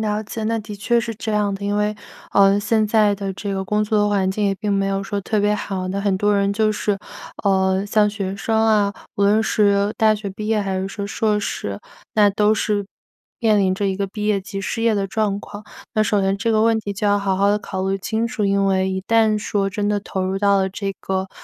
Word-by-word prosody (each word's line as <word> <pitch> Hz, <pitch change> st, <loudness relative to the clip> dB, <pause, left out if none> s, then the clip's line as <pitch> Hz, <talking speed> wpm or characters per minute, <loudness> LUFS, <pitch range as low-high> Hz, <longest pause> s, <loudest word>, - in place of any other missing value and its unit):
了 210 Hz, -1 st, -1 dB
解， 220 Hz, +1 st, -6 dB
那 225 Hz, +1 st, 0 dB
的 210 Hz, -1 st, -7 dB
确 235 Hz, +4 st, +1 dB
是 230 Hz, 0 st, -4 dB
这 220 Hz, +1 st, -5 dB
样 205 Hz, -1 st, +1 dB
的， 200 Hz, -, -6 dB
因 205 Hz, 0 st, 0 dB
为， 210 Hz, 0 st, 0 dB, 0.4 s
呃， 195 Hz, 0 st, +5 dB
现 215 Hz, +1 st, +1 dB
在 210 Hz, -1 st, +3 dB
的 195 Hz, -1 st, -4 dB
这 200 Hz, 0 st, -4 dB
个 190 Hz, -, -2 dB
工 210 Hz, +2 st, 0 dB
作 210 Hz, -1 st, +2 dB
环 195 Hz, -2 st, +1 dB
境 205 Hz, +2 st, -1 dB
也 200 Hz, -, +2 dB
并 210 Hz, 0 st, -2 dB
没 195 Hz, 0 st, +1 dB
有 195 Hz, 0 st, -1 dB
说 200 Hz, +1 st, -3 dB
特 210 Hz, +3 st, -1 dB
别 210 Hz, +1 st, +2 dB
好， 190 Hz, -3 st, -4 dB
那 195 Hz, +2 st, -2 dB
很 200 Hz, -1 st, +1 dB
多 205 Hz, +1 st, +2 dB
人 200 Hz, 0 st, +1 dB
就 215 Hz, +1 st, +1 dB
是， 205 Hz, -1 st, -1 dB, 0.5 s
呃， 190 Hz, -1 st, +2 dB
像 210 Hz, 0 st, +3 dB
学 195 Hz, -2 st, -4 dB
生 220 Hz, +2 st, 0 dB
啊 205 Hz, -2 st, +3 dB, 0.2 s
无 200 Hz, -, -1 dB
论 205 Hz, +2 st, +4 dB
是 205 Hz, -1 st, +2 dB
大 220 Hz, -1 st, +4 dB
学 210 Hz, -1 st, -4 dB
毕 210 Hz, +2 st, -6 dB
业 220 Hz, -1 st, +2 dB
还 190 Hz, -1 st, -2 dB
是 190 Hz, -, -3 dB
说 200 Hz, 0 st, -5 dB
硕 210 Hz, 0 st, 0 dB
士， 100 Hz, -, -4 dB, 0.4 s
那 210 Hz, -1 st, +5 dB
都 210 Hz, +2 st, +2 dB
是 210 Hz, -2 st, 0 dB, 0.5 s
面 220 Hz, -3 st, +3 dB
临 190 Hz, -2 st, +2 dB
着 200 Hz, +1 st, -1 dB
一 195 Hz, -, 0 dB
个 200 Hz, 0 st, -2 dB
毕 210 Hz, +2 st, -4 dB
业 210 Hz, -2 st, +2 dB
及 195 Hz, +1 st, -6 dB
失 225 Hz, +3 st, -3 dB
业 230 Hz, -1 st, +3 dB
的 200 Hz, -2 st, 0 dB
状 205 Hz, -1 st, -1 dB
况。 205 Hz, 0 st, -10 dB, 0.3 s
那 215 Hz, -, +3 dB
首 210 Hz, -1 st, +1 dB
先 195 Hz, 0 st, +1 dB
这 230 Hz, +3 st, -1 dB
个 220 Hz, -1 st, +3 dB
问 225 Hz, -1 st, +3 dB
题 205 Hz, -1 st, -4 dB
就 205 Hz, +1 st, -2 dB
要 205 Hz, -, +4 dB
好 195 Hz, -2 st, 0 dB
好 200 Hz, +1 st, +3 dB
地 205 Hz, -, +3 dB
考 190 Hz, -1 st, -4 dB
虑 195 Hz, -, 0 dB
清 220 Hz, +4 st, -1 dB
楚， 230 Hz, -2 st, -2 dB
因 200 Hz, 0 st, +2 dB
为 190 Hz, -1 st, +1 dB
一 190 Hz, 0 st, -2 dB
旦 220 Hz, 0 st, +3 dB
说 200 Hz, -1 st, -1 dB
真 205 Hz, +1 st, -1 dB
的 205 Hz, -1 st, 0 dB
投 190 Hz, -2 st, -3 dB
入 190 Hz, +1 st, -1 dB
到 200 Hz, 0 st, +3 dB
了 190 Hz, 0 st, +1 dB
这 195 Hz, +1 st, -4 dB
个， 190 Hz, 0 st, -2 dB
205 Hz, 270 characters per minute, -21 LUFS, 195-215 Hz, 0.5 s, 呃